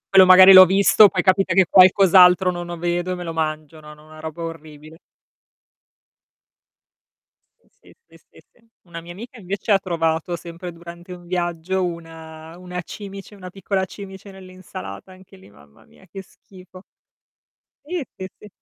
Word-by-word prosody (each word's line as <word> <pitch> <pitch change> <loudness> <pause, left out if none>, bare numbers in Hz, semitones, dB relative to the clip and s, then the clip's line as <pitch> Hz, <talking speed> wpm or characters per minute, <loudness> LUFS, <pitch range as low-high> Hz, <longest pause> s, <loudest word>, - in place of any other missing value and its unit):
Quello 190 -1 +7
magari 185 +1 +8
l'ho 185 0 +10
visto, 200 +3 +4
poi 185 - -3
capita 185 -2 +1
che 190 -2 +4
qualcos'altro 185 -1 +5
non 175 0 -7
lo 175 -1 -7
vedo 175 +1 -3
e - - -5
me 180 - -8
lo 165 -1 -7
mangio, 155 -1 -5
no, 150 0 -14
no, 150 0 -21
una 155 0 -16
roba 160 +1 -8
orribile. 160 -1 -11 2.6
Sì, - - -36
sì, - - -23
sì, - - -20
sì, - - -21
sì. 230 -1 -32 0.2
Una 170 -2 -10
mia 170 - -12
amica 235 +8 -12
invece 200 +2 -5
ha 195 - +4
trovato, 165 -2 -3
sempre 170 +1 -10
durante 170 +1 -13
un 175 -1 -14
viaggio, 175 +1 -3
una 165 -1 -10
una 180 0 -8
cimice, 200 +2 -11
una 185 -2 -11
piccola 190 +1 -4
cimice 195 0 -12
nell'insalata. 185 - -12
Anche 190 +1 -19
lì, 190 - -19
mamma 70 -6 -23
mia - - -23
che 195 +3 -10
schifo. 185 -1 -18 1.0
Sì, 350 +2 -5
sì, 190 0 -9
sì. 210 - -14
180 Hz, 165 wpm, -20 LUFS, 165-190 Hz, 2.6 s, l'ho